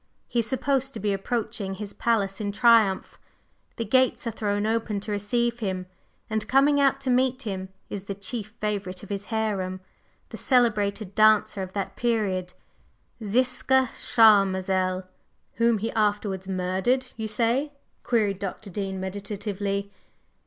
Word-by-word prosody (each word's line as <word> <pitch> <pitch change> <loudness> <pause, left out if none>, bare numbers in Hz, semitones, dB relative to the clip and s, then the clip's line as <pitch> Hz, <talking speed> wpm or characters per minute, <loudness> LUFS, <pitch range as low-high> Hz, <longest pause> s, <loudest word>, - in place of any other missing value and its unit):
He 240 - -1
is 230 - 0
supposed 270 +1 0
to - - -4
be 205 0 0
approaching 205 -1 -3
his 205 0 -6
palace 205 -4 0
in 205 -1 -1
triumph; 225 -3 +3 0.6
the 230 - -3
gates 255 +3 +2
are 230 - -1
thrown 205 -1 -1
open 220 -2 0
to 210 - -5
receive 235 +4 0
him, 190 -4 -2 0.4
and 220 0 -2
coming 285 +2 +4
out 275 -1 +3
to 265 -2 0
meet 255 +1 +2
him 190 -3 -4 0.2
is 200 -1 -6
the 200 - -4
chief 205 +2 -6
favorite 200 -3 -3
of 205 - -11
his 200 0 -3
harem, 200 -4 -2 0.5
the - - -8
celebrated 215 -5 +1
dancer 215 -2 +4
of 185 0 -6
that 200 -1 -3
period 195 -6 -1 0.7
Ziska 255 +3 +2
Charmazel." 190 -4 +3 0.5
"Whom 230 -1 +3
he 220 +3 -3
afterwards 205 -3 0
murdered, 190 +8 0
you 220 -1 -4
say?" 235 +7 +1 0.3
queried 210 -5 +1
Dr. 200 +1 -6
Dean 190 0 -3
meditatively. 200 +1 -3
210 Hz, 145 wpm, -26 LUFS, 195-235 Hz, 0.7 s, coming